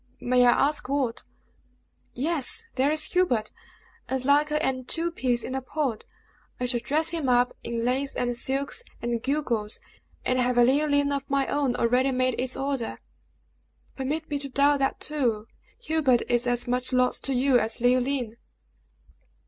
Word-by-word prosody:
"May 250 0 +3
I 245 +3 +4
ask 295 -3 -3
what?" 270 -5 -1 0.9
"Yes! 330 - +2
there 270 +2 +2
is 305 0 +1
Hubert, 255 -13 +1 0.6
as 260 -1 -1
like 290 +2 +3
her 300 - -1
an 265 -4 -1
two 335 +5 0
peas 245 -6 -1
in 255 - -5
a 265 - -2
pod. 260 -4 -3 0.5
I 250 - -1
shall 245 -1 0
dress 300 +7 0
him 325 -6 -2
up 245 0 +2
in 230 0 -3
lace 265 +3 0
and 245 -1 -1
silks, 275 - 0 0.2
and 235 -1 -2
gewgaws, 240 -7 -1 0.5
and 255 0 +1
have 250 0 +1
a 240 - +6
Leoline 285 +2 +2
of 275 0 -5
my 275 -1 +1
own 280 -4 0
already 250 +3 +2
made 255 -1 0
its 255 0 -1
order." 270 -3 -3 1.0
"Permit 295 +4 -3
me 290 -1 -3
to 280 0 -6
doubt 280 +2 +3
that, 270 0 0
too! 240 -8 -1 0.4
Hubert 310 - +2
is 240 +1 +1
as 245 0 0
much 250 +1 -1
lost 255 -1 +1
to 270 - 0
you 255 0 +3
as 225 - 0
Leoline!" 245 -1 +1
260 Hz, 165 wpm, -26 LUFS, 245-285 Hz, 1.0 s, a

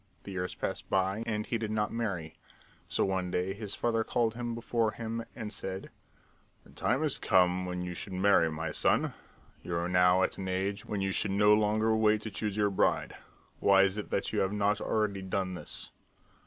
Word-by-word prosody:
The 100 - -8
years 90 -1 -3
passed - - -4
by 95 +3 +1
and 105 -1 -1
he 115 - -2
did 110 -1 -3
not 105 0 -1
marry, 95 -9 -3 0.5
so - - +1
one 95 -2 -1
day 90 +1 -1
his 105 0 -5
father 115 -1 +1
called 115 -1 0
him 120 0 -4
before 115 -1 0
him 115 0 -4
and 110 -3 -5
said: 95 0 -6 0.7
"The - - -18
time 135 +4 0
has 150 -3 0
come 90 0 +3
when 90 0 -3
you 90 0 -4
should 95 +2 -5
marry, 90 -3 +4
my 80 +1 -3
son. - - +2 0.5
You 85 - -4
are 85 +1 0
now 90 +1 +4
at - - +1
the 95 -1 -5
age 100 +3 -2
when 105 -2 -2
you 95 0 0
should 100 - +2
no 105 +2 +5
longer 110 +1 +2
wait 110 -1 +3
to 110 - -6
choose 105 0 -3
your 105 -1 +2
bride. 95 - +1 0.4
Why 100 -1 +6
is 95 0 +1
it 105 - -6
that - - -1
you - - +1
have 95 +1 +1
not 105 0 +1
already 105 -3 0
done 95 0 -2
this?" 90 - -5
100 Hz, 205 wpm, -30 LUFS, 95-110 Hz, 0.7 s, Why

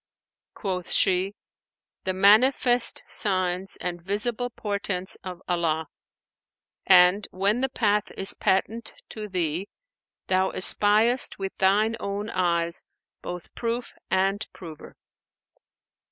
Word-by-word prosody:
Quoth 185 -4 -4
she, 190 +1 +2 0.7
'The 185 - 0
manifest 240 +5 +4
signs 185 -1 -1
and 175 -1 -4
visible 215 +6 -1
portents 200 -4 -3
of 185 -1 -8
Allah; 160 -3 -1 1.0
and, 185 +2 +6
when 200 +6 0
the 265 - +1
path 210 -5 +1
is 195 +1 -2
patent 220 +4 -1 0.2
to 215 -1 -7
thee, 180 0 -2 0.6
thou 190 0 +2
espiest 215 +6 +3
with 195 -1 -5
thine 210 +4 +3
own 205 +2 -4
eyes 170 -2 0 0.4
both 175 -1 -7
proof 235 +1 -3 0.2
and 195 +2 +1
prover.' 160 -4 -11
195 Hz, 105 wpm, -25 LUFS, 180-215 Hz, 1.0 s, and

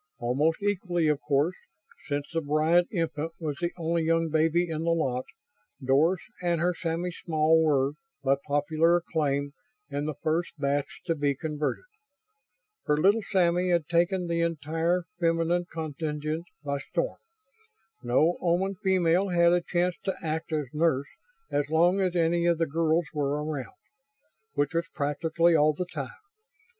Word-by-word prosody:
Almost 145 +10 0
equally 180 -5 0
of 150 -2 0
course 145 +4 +1 0.5
since 145 -1 -2
the 165 - 0
Bryant 155 +4 +3
infant 165 -3 -2
was 150 -4 -3
the 175 0 0
only 170 0 0
young 165 0 +1
baby 165 +3 +2
in 160 -1 -3
the 170 - 0
lot 130 -7 0 0.5
Doris 150 +7 +2 0.2
and 175 -2 +1
her 175 +2 +2
Sammy 170 +1 -2
Small 160 -1 +2
were, 140 -3 +2 0.3
by 135 0 +3
popular 155 +4 +2
acclaim, 145 -5 -1 0.4
in 145 +1 -2
the 155 - -3
first 165 +1 -2
batch 140 0 -1
to 165 - +1
be 145 -3 0
converted. 150 - -3 1.0
For 150 - +1
little 200 +8 +4
Sammy 180 -1 +2
had 170 -4 +1
taken 175 +2 +2
the 170 0 0
entire 165 +2 0 0.2
feminine 165 +1 +1
contingent 155 0 -3 0.2
by 140 -1 -2
storm. - - -3 0.8
No 140 +8 +2
Oman 185 +2 +1
female 185 0 +3
had 170 -1 +4
a 175 - +3
chance 175 +1 0
to 190 - 0
act 160 +1 -3
as 150 -2 0
nurse 150 -3 +1 0.4
as 145 0 0
long 175 +4 +3
as 185 -2 0
any 170 0 +2
of 170 -1 +3
the 165 - +1
girls 165 +2 +1
were 145 0 -1
around. 145 -5 -5 0.8
Which 145 +1 0
was 170 +1 0
practically 165 +3 +2
all 155 0 +4
the 180 +5 -3
time. - - -5
165 Hz, 150 wpm, -27 LUFS, 150-175 Hz, 1.0 s, little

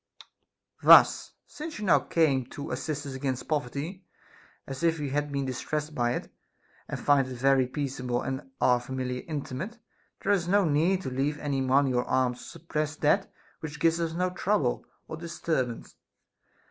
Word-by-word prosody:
Thus, - - +7
since 310 -5 -7
now 205 -4 +4
you - - -14
came 140 -7 +2
to 145 +2 -7
assist 150 -2 -3
us 140 - -5
against 130 -1 -3
poverty 150 +6 -3 0.6
as 135 0 -7
if 165 -1 +2
we 145 -3 -3
had 145 +1 -1
been 140 -1 -1
dis 130 -1 -4
tressed 150 0 -3
by 120 -3 +1
it, - - -5 0.5
and - - -4
find 140 -2 +3
it 130 - -6
very 135 +1 +3
peaceable 130 -3 -2
and 135 +1 -4
our 125 -1 +4
familiar 125 0 -4
inmate, 155 - -5 0.5
there - - +2
is 185 -4 +2
no 200 +1 +4
need 170 +5 +2
to 130 - -4
leave 140 +3 -1
any 140 -3 -1
money 130 0 +3
or 125 0 +2
arms 130 -1 +1
to - - -11
suppress 155 -1 -3
that 160 +6 +2 0.3
which 150 -1 -7
gives 165 +1 +3
us 165 -1 -1
no 180 +2 0
trouble 180 -8 0 0.2
or - - -6
disturbance. 160 -7 -3
145 Hz, 170 wpm, -28 LUFS, 130-165 Hz, 0.6 s, Thus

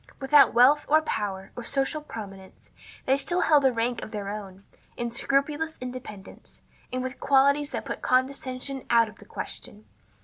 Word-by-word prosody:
Without 280 +1 +6
wealth, 275 +5 +6
or 310 +1 +5
power, 195 -8 -3
or 240 - -6
social 275 +5 -1
prominence, 195 -8 -10 0.3
they 265 - +3
still 345 +6 0
held 295 -3 +4
a 265 - +5
rank 235 0 -1
of - - -7
their 205 -2 -5
own, 200 -2 -8 0.3
in 240 0 -3
scrupulous 290 +6 -1
independence, 250 -6 -10 0.3
and 255 0 -2
with 260 +1 -6
qualities 280 +1 +3
that - - -5
put - - -5
condescension 260 +1 -1
out 230 -1 +5
of 210 - -16
the - - -14
question. 105 +1 -8
255 Hz, 165 wpm, -26 LUFS, 215-280 Hz, 0.3 s, Without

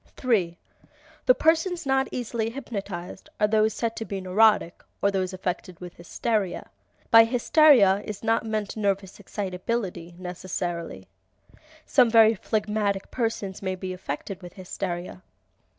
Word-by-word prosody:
3. 190 -10 +1 0.7
The - - +7
persons 330 +1 +1
not 270 0 +2
easily 235 -2 -2
hypnotized 200 -8 -7
are 210 - +4
those 215 0 +2
said 230 -1 -2
to - - -3
be 200 -3 -5
neurotic 190 -1 +2 0.2
(or 200 - +2
those 190 -1 -1
affected 185 -1 -5
with 180 -1 -9
hysteria). 195 +2 -2 0.4
By 225 0 +9
"hysteria" 240 - +5
is 210 -1 -7
not 225 0 +2
meant 215 -2 -3
nervous 200 -2 -2
excitability, 185 -2 -4
necessarily. 175 - -5 0.8
Some 250 -4 +4
very 225 -1 +6
phlegmatic 210 -2 -2
persons 225 -5 -3
may 190 -1 -2
be 185 0 -5
affected 185 +2 -6
with 175 -1 -10
hysteria. 185 -1 -5
200 Hz, 130 wpm, -25 LUFS, 185-225 Hz, 0.8 s, By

